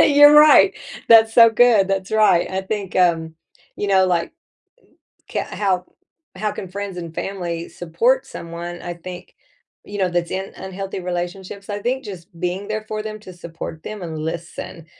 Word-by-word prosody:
You're 290 0 +7
right, 300 0 +7 0.4
that's 225 -1 +7
so 230 -1 +8
good, 225 -4 +4
that's 195 -1 -2
right, 215 -5 +3
I 190 0 -2
think, 200 -1 -4
um, 165 -3 +2 0.4
you 205 - -2
know, 190 -1 +4
like 175 -2 0 1.0
k - - -2
how 190 -3 -1 0.5
how 210 +2 -2
can 190 - -7
friends 200 0 -6
and 165 -2 -7
family 170 -3 -4
support 230 +11 0
someone, 170 +1 -7
I 175 - -5
think, 180 +1 -10 0.5
you 205 - -7
know, 190 -2 +2
that's 175 -1 -1
in 190 +1 -4
unhealthy 190 0 -6
relationships? 180 +3 -5
I 205 - -3
think 255 +5 -2
just 185 -4 -9
being 180 +4 -3
there 215 0 -3
for 215 0 -3
them 215 0 -6
to 185 -3 -11
support 165 -2 -8
them 215 +1 -7
and 160 -2 -5
listen 165 +1 -6
190 Hz, 170 wpm, -21 LUFS, 175-210 Hz, 1.0 s, so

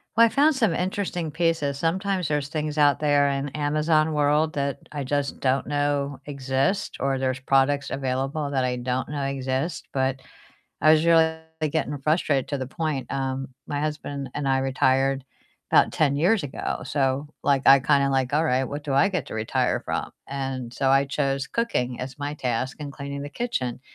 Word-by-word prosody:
Well, 230 +1 +7
I - - -2
found 290 +5 +3
some 225 -10 +2
interesting 180 -3 -2
pieces, 165 -4 0
sometimes 185 +2 0
there's 145 -2 -1
things 150 0 -3
out 145 -1 +4
there 145 -1 +3
in 140 +1 -2
Amazon 155 +2 +1
world 150 +1 +2
that 140 -2 -1
I 145 -2 -4
just 140 +1 -2
don't 135 0 +1
know 145 -2 -1
exist, 140 +6 -1
or 135 0 0
there's 130 -1 -1
products 135 +1 +2
available 135 +2 -2
that 135 -2 +1
I 125 0 0
don't 125 +1 -2
know 145 -1 -3
exist, 135 +3 -2
but 130 0 0 0.6
I 155 - +6
was 155 0 +4
really 160 -1 +4 0.3
getting 145 -2 -1
frustrated 145 -2 +1
to 140 - -2
the 130 -1 -4
point, 155 -3 -3
um, 135 -1 -2 0.2
my 145 -1 -2
husband 145 -2 -4
and 145 -1 -3
I 135 0 +3
retired 135 0 +1 0.4
'bout - - +5
10 145 -3 +2
years 175 +6 +2
ago, 135 - -4
so, 135 0 0 0.2
like, 140 -2 +2
I 135 0 +8
kinda 140 +1 +3
like, 135 0 0
"All 155 +3 +3
right, 130 -4 +2
what 145 +2 -6
do 145 - -2
I 160 +8 +5
get 180 -9 -2
to - - -7
retire 110 0 0
from?" - - -3 0.2
And 135 -3 -4
so 135 +1 +1
I 135 +1 +4
chose 135 -1 -1
cooking 125 - -1
as 130 +2 -7
my 145 +1 -3
task 130 -1 -2
and 145 -2 -6
cleaning 140 0 -6
the 145 - -5
kitchen, 135 - -3
140 Hz, 185 wpm, -25 LUFS, 135-155 Hz, 0.6 s, I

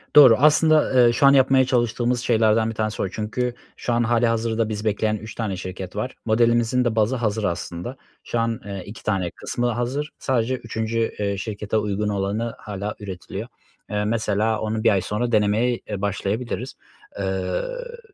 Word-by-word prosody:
Doğru. 135 -6 +10
Aslında, 150 -3 +5
eee, - - +4
şu 130 - +3
an 140 - +8
yapmaya 135 -1 +5
çalıştığımız 120 -1 +1
şeylerden 110 -1 +3
1 115 - -5
tanesi 110 0 -2
o - - 0
çünkü 115 +5 -2 0.2
şu 120 - -2
an 120 0 +2
hâlihazırda 115 -1 +1
bizi 105 0 -4
bekleyen 110 0 +1
3 110 +1 -9
tane 105 -5 -2
şirket 95 0 -7
var. 110 +5 -3
Modelimizin 120 +2 +3
de 115 -2 0
bazı 110 +3 +2
hazır 110 -3 -1
aslında. 90 +5 -3 0.3
Şu 120 - -2
an, 115 -1 0
eee, 100 -2 -5
2 105 - -10
tane 95 -4 0
kısmı 120 0 -2
hazır. 125 +6 -2
Sadece 130 -1 0
3'üncü, 115 -1 -3 0.2
eee, 100 -1 -1
şirkete 105 +1 -3
uygun 105 0 -1
olanı 105 +3 -1
hâlâ 105 0 -5
üretiliyor. 95 -4 -6 0.4
Eee, 105 0 -1
mesela 110 0 0
onu 110 0 -2
1 - - +6
ay 95 -2 +3
sonra 105 +6 -2
denemeye, 110 +3 +2
eee, 95 - -4
başlayabiliriz. 105 +5 -2 0.5
Iıı, 285 - -3
110 Hz, 170 wpm, -23 LUFS, 105-120 Hz, 0.5 s, Doğru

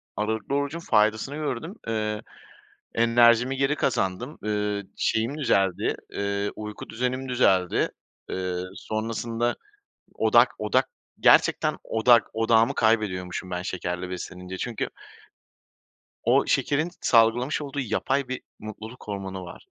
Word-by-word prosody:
Aralıklı 110 +5 -2
orucun 145 +3 -1
faydasını 110 0 +2
gördüm. 155 - -4
Eee, 105 -1 -1 0.7
enerjimi 120 +2 +4
geri 135 +2 +2
kazandım. 125 +1 -1
Iıı, 105 -1 -1
şeyim 115 +7 0
düzeldi, 95 - +1 0.2
eee, 100 0 -1
uyku 105 0 -7
düzenim 125 +2 -2
düzeldi. 95 -8 +2 0.4
Eee, 90 -1 -2 0.2
sonrasında 115 +2 -2 0.6
odak - - +5
odak - - +2 0.3
gerçekten 155 -1 +4
odak 115 +1 +5
odağımı 115 0 +3
kaybediyormuşum 95 -5 0
ben 90 0 -3
şekerle 90 -1 -4
beslenince. 90 +1 -6
Çünkü 115 +3 -3 1.4
o - - +4
şekerin 155 +4 +1
salgılamış 120 +5 +3
olduğu 140 -1 -5
yapay 130 +2 0
bir 130 0 -4 0.2
mutluluk 110 +2 -9
hormonu 95 -2 -5
var. 85 - -12
110 Hz, 110 wpm, -26 LUFS, 100-125 Hz, 1.4 s, odak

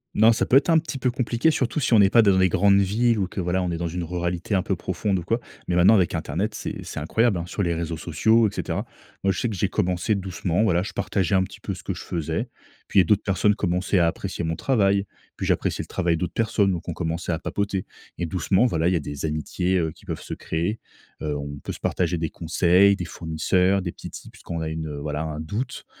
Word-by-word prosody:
Non, 110 +2 +6
ça 115 - +1
peut 130 - +5
être 140 - +2
un 165 - +6
petit 155 -4 -2
peu 125 - +1
compliqué, 120 +3 +1
surtout 135 -3 0
si 130 - 0
on 110 - +7
est 100 -1 +5
pas 115 - +7
dans 100 -3 +4
les 95 - +5
grandes 100 +2 +4
villes 110 +4 +2
ou 95 -3 0
que 95 - -4
voilà, 90 +1 0
on 90 - -1
est 85 - -2
dans 85 0 -2
une 85 +1 -4
ruralité 85 +3 -3
un 95 - +3
peu 95 - -1
profonde 95 +3 -1
ou 90 - -4
quoi, 115 +7 0 0.3
mais 90 - 0
maintenant, 90 +5 +6
avec 95 -4 +2
Internet, 90 +6 -2
c'est - - -5
c'est - - -6
incroyable 100 +6 +1
hein 85 - -4
sur 100 - -2
les 85 -2 +1
réseaux 85 0 -3
sociaux, 110 +9 +3
et - - -5
cetera. - - -3 0.4
Moi, 95 0 +3
je - - -4
sais 120 - 0
que 105 - -4
j'ai 95 +1 0
commencé 90 +1 0
doucement. 95 -2 -1
Voilà, 90 -5 +2
je - - -6
partageais 95 -2 -1
un 95 - +5
petit - - -9
peu - - -4
ce - - -9
que - - -4
je - - -8
faisais. 85 - -2 0.4
Puis, - - +3
il - - +9
y - - +4
a - - -5
d'autres 105 +4 +2
personnes 100 +2 +2
commençaient 90 +1 0
à 85 - +4
apprécier 90 +1 -3
mon 80 0 -1
travail. 100 - +2 0.3
Puis, - - -4
j'appréciais - - 0
le - - -8
travail 85 -1 0
d'autres 85 +1 -3
personnes, 105 -3 +2
donc 90 -1 -4
on 85 - -2
commençait 85 +1 -3
à 80 - -1
papoter 100 +1 -2 0.3
et 85 - -1
doucement, 95 +7 +2
voilà, 85 -6 0
il 95 - +1
y - - +2
a - - +2
des 75 0 -5
amitiés, 90 +4 -1
heu, 80 -2 -1
qui - - -19
peuvent - - -5
se - - -6
créer. 85 +8 -2 0.4
Heu, 75 -1 -1
on 70 0 -5
peut - - -4
se - - -10
partager 90 -1 0
des 80 -1 -1
conseils, 90 +5 +3
des 90 - -5
fournisseurs, 90 +4 +1
des 85 - -3
petits - - -10
tips - - -11
quand 85 - -5
on - - -3
a 80 - -2
une, 80 0 -4
heu, 75 -1 -5
voilà, 75 +1 -3
un 80 -1 -4
doute 105 +12 -4
90 Hz, 270 wpm, -24 LUFS, 85-100 Hz, 0.4 s, il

